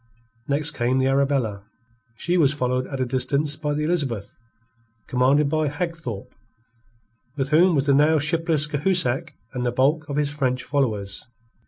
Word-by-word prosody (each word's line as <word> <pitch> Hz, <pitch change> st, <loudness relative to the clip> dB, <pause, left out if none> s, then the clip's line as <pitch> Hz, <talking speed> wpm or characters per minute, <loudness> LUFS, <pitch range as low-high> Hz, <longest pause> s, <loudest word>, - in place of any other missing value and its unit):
Next 145 Hz, +2 st, 0 dB
came 125 Hz, 0 st, 0 dB
the 130 Hz, -, +2 dB
Arabella. 135 Hz, -6 st, +1 dB, 0.5 s
She 175 Hz, +8 st, -1 dB
was 150 Hz, -4 st, +3 dB
followed 130 Hz, -2 st, -1 dB
at 135 Hz, -, -5 dB
a 130 Hz, -, +1 dB
distance 140 Hz, +4 st, 0 dB
by 150 Hz, -1 st, -2 dB
the 150 Hz, -, -1 dB
Elizabeth, 140 Hz, -, -2 dB, 0.7 s
commanded 135 Hz, +4 st, +2 dB
by 155 Hz, +1 st, 0 dB
Hagthorpe, 145 Hz, -, -5 dB, 1.0 s
with 135 Hz, -1 st, -1 dB
whom 170 Hz, +3 st, +5 dB
was 140 Hz, -1 st, +1 dB
the 140 Hz, -, +3 dB
now 150 Hz, +3 st, +4 dB
shipless 160 Hz, 0 st, +1 dB
Cahusac 150 Hz, -1 st, 0 dB, 0.2 s
and 125 Hz, -1 st, -3 dB
the 120 Hz, -, 0 dB
bulk 145 Hz, +5 st, +1 dB
of 140 Hz, -, -3 dB
his 145 Hz, -1 st, 0 dB
French 130 Hz, -3 st, -1 dB
followers. 110 Hz, -9 st, -1 dB
140 Hz, 155 wpm, -23 LUFS, 130-155 Hz, 1.0 s, whom